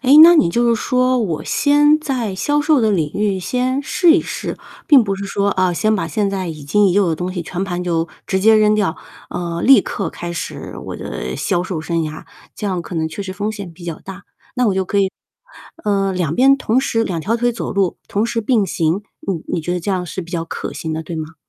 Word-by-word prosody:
哎， 260 Hz, -, +1 dB
那 345 Hz, +2 st, +9 dB
你 175 Hz, -, +4 dB
就 235 Hz, +5 st, +2 dB
是 230 Hz, -, +4 dB
说， 255 Hz, +2 st, +1 dB
我 175 Hz, -9 st, -2 dB
先 295 Hz, +1 st, +4 dB
在 250 Hz, -9 st, -2 dB
销 290 Hz, +10 st, +1 dB
售 300 Hz, -2 st, +3 dB
的 220 Hz, -2 st, +2 dB
领 160 Hz, -7 st, 0 dB
域 205 Hz, -2 st, 0 dB
先 255 Hz, +6 st, -1 dB
试 340 Hz, +3 st, +3 dB
一 335 Hz, -, +4 dB
试， -, -, -5 dB, 0.3 s
并 280 Hz, -6 st, +7 dB
不 195 Hz, -1 st, -1 dB
是 200 Hz, -, -5 dB
说， 200 Hz, 0 st, 0 dB
哦， 185 Hz, -1 st, +2 dB
先 215 Hz, +5 st, +1 dB
把 -, -, -2 dB
现 210 Hz, -2 st, 0 dB
在 190 Hz, -3 st, -3 dB
已 155 Hz, -3 st, -7 dB
经 200 Hz, +8 st, +3 dB
已 -, -, +1 dB
有 200 Hz, -2 st, +3 dB
的 165 Hz, -, +1 dB
东 180 Hz, +2 st, -3 dB
西 175 Hz, -2 st, -3 dB
全 180 Hz, +3 st, -4 dB
盘 180 Hz, -2 st, -3 dB
就 165 Hz, -1 st, 0 dB, 0.2 s
直 190 Hz, 0 st, 0 dB
接 220 Hz, +2 st, +6 dB
扔 215 Hz, 0 st, +4 dB
掉， 195 Hz, -5 st, 0 dB, 0.3 s
嗯， 170 Hz, -1 st, -3 dB
立 270 Hz, -, +8 dB
刻 200 Hz, -, -4 dB
开 175 Hz, 0 st, -6 dB
始 170 Hz, -, -6 dB
我 -, -, -5 dB
的 65 Hz, +1 st, -5 dB
销 175 Hz, -2 st, 0 dB
售 180 Hz, -3 st, -4 dB
生 165 Hz, +1 st, -2 dB
涯， 155 Hz, 0 st, -6 dB, 0.3 s
这 210 Hz, -, -5 dB
样 185 Hz, -3 st, -2 dB
可 180 Hz, -, -8 dB
能 160 Hz, -1 st, -1 dB
确 200 Hz, -, -6 dB
实 190 Hz, -1 st, -6 dB
风 205 Hz, +2 st, -3 dB
险 200 Hz, -5 st, -8 dB
比 170 Hz, +1 st, -13 dB
较 165 Hz, -2 st, -5 dB
大。 195 Hz, +1 st, -10 dB, 0.3 s
那 250 Hz, -1 st, +2 dB
我 195 Hz, -, +2 dB
就 190 Hz, 0 st, 0 dB
可 200 Hz, +2 st, -1 dB
以， 190 Hz, -1 st, +2 dB, 0.7 s
呃， 195 Hz, -2 st, +1 dB
两 170 Hz, -4 st, -1 dB
边 270 Hz, +2 st, +5 dB
同 250 Hz, -1 st, +1 dB
时 225 Hz, -4 st, 0 dB
两 170 Hz, -3 st, -3 dB
条 225 Hz, +8 st, 0 dB
腿 240 Hz, 0 st, +1 dB
走 230 Hz, -, -4 dB
路， 195 Hz, -3 st, 0 dB
同 205 Hz, +3 st, 0 dB
时 235 Hz, -1 st, -1 dB
并 215 Hz, -3 st, +2 dB
行， 165 Hz, +4 st, 0 dB, 0.2 s
你 180 Hz, -5 st, -2 dB
你 165 Hz, -, 0 dB
觉 175 Hz, +3 st, -3 dB
得 180 Hz, -, -2 dB
这 195 Hz, -, -3 dB
样 180 Hz, -2 st, -1 dB
是 185 Hz, -, -5 dB
比 170 Hz, -, -13 dB
较 165 Hz, -1 st, -2 dB
可 -, -, -6 dB
行 160 Hz, -, -5 dB
的， 160 Hz, +1 st, -3 dB
对 165 Hz, +1 st, -6 dB
吗？ 155 Hz, +1 st, -6 dB
195 Hz, 270 characters per minute, -18 LUFS, 175-230 Hz, 0.7 s, 那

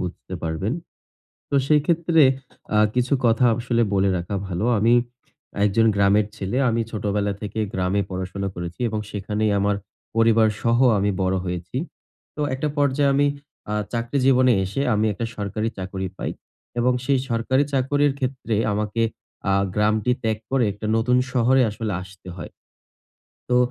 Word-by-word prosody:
বুঝতে 90 Hz, 0 st, -6 dB
পারবেন। 80 Hz, +7 st, -2 dB, 0.8 s
তো -, -, 0 dB
সেই 150 Hz, -1 st, +4 dB
ক্ষেত্রে 170 Hz, -1 st, +3 dB, 0.5 s
আ -, -, +5 dB, 0.2 s
কিছু 125 Hz, +3 st, +1 dB
কথা 115 Hz, +2 st, +4 dB
আসলে 120 Hz, -1 st, 0 dB
বলে 95 Hz, 0 st, +3 dB
রাখা 95 Hz, +4 st, -4 dB
ভালো। 90 Hz, +4 st, -2 dB
আমি 115 Hz, +3 st, +4 dB, 0.7 s
একজন 115 Hz, +3 st, +3 dB
গ্রামের 100 Hz, +1 st, +4 dB
ছেলে। 100 Hz, +6 st, -3 dB
আমি 115 Hz, 0 st, +1 dB
ছোটবেলা 105 Hz, -1 st, -1 dB
থেকে 110 Hz, +1 st, -4 dB
গ্রামে 95 Hz, +2 st, 0 dB
পড়াশোনা 95 Hz, +1 st, -4 dB
করেছি 85 Hz, +3 st, -6 dB
এবং 110 Hz, 0 st, -2 dB
সেখানেই 105 Hz, +1 st, -1 dB
আমার 100 Hz, +1 st, +1 dB, 0.4 s
পরিবারসহ 115 Hz, 0 st, +3 dB, 0.2 s
আমি 100 Hz, +1 st, +1 dB
বড় 95 Hz, 0 st, +1 dB
হয়েছি। 90 Hz, +6 st, -4 dB, 0.6 s
তো 150 Hz, -, -4 dB
একটা 135 Hz, +3 st, -1 dB
পর্যায়ে 140 Hz, 0 st, +2 dB
আমি 145 Hz, +1 st, +3 dB, 0.4 s
আ -, -, 0 dB, 0.2 s
চাকরি 120 Hz, +4 st, -1 dB
জীবনে 130 Hz, -1 st, +5 dB
এসে 105 Hz, +9 st, -2 dB
আমি 105 Hz, +1 st, +2 dB
একটা 115 Hz, -, -3 dB
সরকারি 105 Hz, +2 st, -2 dB
চাকুরি 95 Hz, 0 st, -4 dB
পাই। -, -, -3 dB, 0.5 s
এবং 125 Hz, +1 st, +3 dB
সেই 135 Hz, 0 st, +2 dB
সরকারি 125 Hz, +4 st, +2 dB
চাকুরির 145 Hz, +2 st, +2 dB
ক্ষেত্রে 130 Hz, -4 st, -2 dB, 0.2 s
আমাকে 105 Hz, +2 st, -1 dB, 0.5 s
আ -, -, +3 dB, 0.2 s
গ্রামটি 105 Hz, +2 st, +2 dB
ত্যাগ 110 Hz, -1 st, 0 dB
করে, 135 Hz, -3 st, +3 dB
একটা 105 Hz, +2 st, -8 dB
নতুন 125 Hz, +2 st, +2 dB
শহরে 130 Hz, +1 st, +3 dB
আসলে 105 Hz, -1 st, -3 dB
আসতে 95 Hz, -1 st, -12 dB
হয়। -, -, -8 dB, 1.0 s
তো 125 Hz, -, +3 dB
110 Hz, 150 wpm, -23 LUFS, 100-125 Hz, 1.0 s, আ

